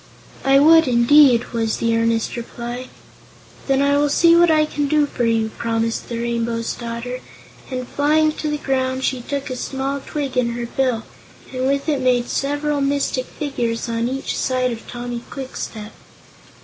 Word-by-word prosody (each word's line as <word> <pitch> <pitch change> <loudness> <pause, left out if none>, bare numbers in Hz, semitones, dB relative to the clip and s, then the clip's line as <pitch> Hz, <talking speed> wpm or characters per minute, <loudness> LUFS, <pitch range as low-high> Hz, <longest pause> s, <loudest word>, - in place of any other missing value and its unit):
"I 270 0 +5
would, 320 +2 +6
indeed," 245 0 +5
was 225 -1 0
the 230 0 +1
earnest 230 0 0
reply. 240 +1 -6 0.8
"Then 270 0 +2
I 285 0 +3
will 290 0 +2
see 335 +3 +5
what 345 0 +5
I 310 -1 +4
can 295 -1 -2
do 300 +1 +3
for 245 -4 -2
you," 225 -1 +1
promised 230 0 -1
the 235 - -3
Rainbow's 235 -1 -2
Daughter, 235 +1 -5 0.5
and 255 -2 -4
flying 305 +2 +2
to 305 - -2
the 300 - -1
ground 260 -2 -1
she 260 -2 0
took 280 +2 -4
a - - -2
small 270 +2 -3
twig 280 -3 -4
in 240 -2 +1
her 240 0 -4
bill 245 -2 -1 0.5
and 255 0 -1
with 275 +2 0
it 290 -4 0
made 250 -1 +2
several 290 +1 -1
mystic 275 -2 0
figures 240 -6 -3
on 230 +1 -1
each 270 +1 -3
side 255 -1 0
of 230 -1 -8
Tommy 240 0 -5
Kwikstep. 225 -5 -6
255 Hz, 170 wpm, -20 LUFS, 235-285 Hz, 0.8 s, would